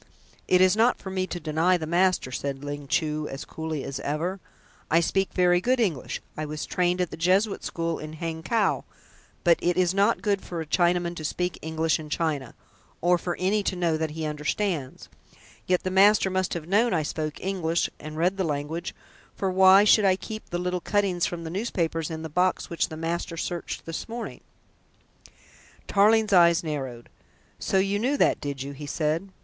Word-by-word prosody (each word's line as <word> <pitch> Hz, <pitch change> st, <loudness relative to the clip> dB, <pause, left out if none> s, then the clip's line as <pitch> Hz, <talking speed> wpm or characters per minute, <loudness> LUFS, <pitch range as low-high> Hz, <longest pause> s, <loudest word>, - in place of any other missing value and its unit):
"It 180 Hz, 0 st, +4 dB
is 185 Hz, +1 st, +5 dB
not 230 Hz, +3 st, +3 dB
for 190 Hz, -, -8 dB
me 185 Hz, -1 st, -1 dB
to 175 Hz, -, -5 dB
deny 165 Hz, +3 st, +2 dB
the 160 Hz, -, -4 dB
master," 175 Hz, -4 st, +1 dB
said 135 Hz, +1 st, -4 dB
Ling 145 Hz, 0 st, -5 dB
Chu 155 Hz, -1 st, 0 dB
as 135 Hz, -, -7 dB
coolly 160 Hz, -3 st, -4 dB
as 135 Hz, -, -5 dB
ever. 170 Hz, +7 st, -2 dB, 0.5 s
"I 165 Hz, -, +5 dB
speak 190 Hz, +3 st, 0 dB
very 180 Hz, -1 st, +3 dB
good 255 Hz, +5 st, +1 dB
English. 180 Hz, -, -1 dB
I 155 Hz, -, -4 dB
was 150 Hz, 0 st, -4 dB
trained 180 Hz, 0 st, 0 dB
at 180 Hz, -, -1 dB
the -, -, -7 dB
Jesuit 190 Hz, +5 st, +2 dB
School 165 Hz, -1 st, -2 dB
in 155 Hz, 0 st, -7 dB
Hangkow, 165 Hz, +7 st, -1 dB, 0.6 s
but 170 Hz, -2 st, +4 dB
it 175 Hz, 0 st, +1 dB
is 180 Hz, -1 st, +3 dB
not 200 Hz, +4 st, +2 dB
good 200 Hz, -3 st, +1 dB
for 175 Hz, -, -6 dB
a 160 Hz, -, -3 dB
Chinaman 175 Hz, +1 st, +1 dB
to 155 Hz, -, -6 dB
speak 180 Hz, +3 st, -2 dB
English 160 Hz, 0 st, 0 dB
in 155 Hz, -1 st, -8 dB
China, 150 Hz, -5 st, -2 dB, 0.4 s
or 175 Hz, +1 st, +3 dB
for 175 Hz, +1 st, -3 dB
any 195 Hz, +3 st, +1 dB
to 195 Hz, -, -1 dB
know 170 Hz, -3 st, +1 dB
that 160 Hz, 0 st, -1 dB
he 155 Hz, +1 st, -5 dB
understands. 150 Hz, 0 st, -2 dB, 0.6 s
Yet 180 Hz, -1 st, +2 dB
the 185 Hz, -, -2 dB
master 195 Hz, 0 st, +5 dB
must 185 Hz, -1 st, -1 dB
have 165 Hz, -2 st, -5 dB
known 205 Hz, +2 st, +3 dB
I 160 Hz, -, +1 dB
spoke 155 Hz, 0 st, -4 dB
English 175 Hz, -3 st, 0 dB
and 155 Hz, 0 st, -8 dB
read 180 Hz, +4 st, +1 dB
the 190 Hz, -, 0 dB
language, 155 Hz, +2 st, -3 dB, 0.4 s
for 190 Hz, -1 st, -1 dB
why 190 Hz, +1 st, +7 dB
should 210 Hz, 0 st, +5 dB
I 190 Hz, -2 st, +4 dB
keep 215 Hz, +3 st, -8 dB
the 175 Hz, -, -2 dB
little 180 Hz, 0 st, -2 dB
cuttings 195 Hz, -4 st, +1 dB
from 170 Hz, -1 st, -5 dB
the 160 Hz, -, -6 dB
newspapers 170 Hz, -6 st, -2 dB
in 160 Hz, -1 st, -5 dB
the -, -, -3 dB
box 180 Hz, +4 st, 0 dB
which 170 Hz, -, 0 dB
the 155 Hz, -, -7 dB
master 165 Hz, +1 st, -3 dB
searched 175 Hz, 0 st, -4 dB
this 165 Hz, +6 st, -5 dB
morning?" 235 Hz, +1 st, -6 dB, 1.4 s
Tarling's 215 Hz, +1 st, +4 dB
eyes 170 Hz, -2 st, +6 dB
narrowed. 135 Hz, -7 st, -5 dB, 0.5 s
"So -, -, 0 dB
you 195 Hz, +1 st, +1 dB
knew 265 Hz, +6 st, +1 dB
that, -, -, +2 dB
did 140 Hz, -2 st, -4 dB
you?" 140 Hz, -, -6 dB
he 145 Hz, +1 st, -8 dB
said. 160 Hz, +6 st, -1 dB
175 Hz, 195 wpm, -26 LUFS, 155-190 Hz, 1.4 s, why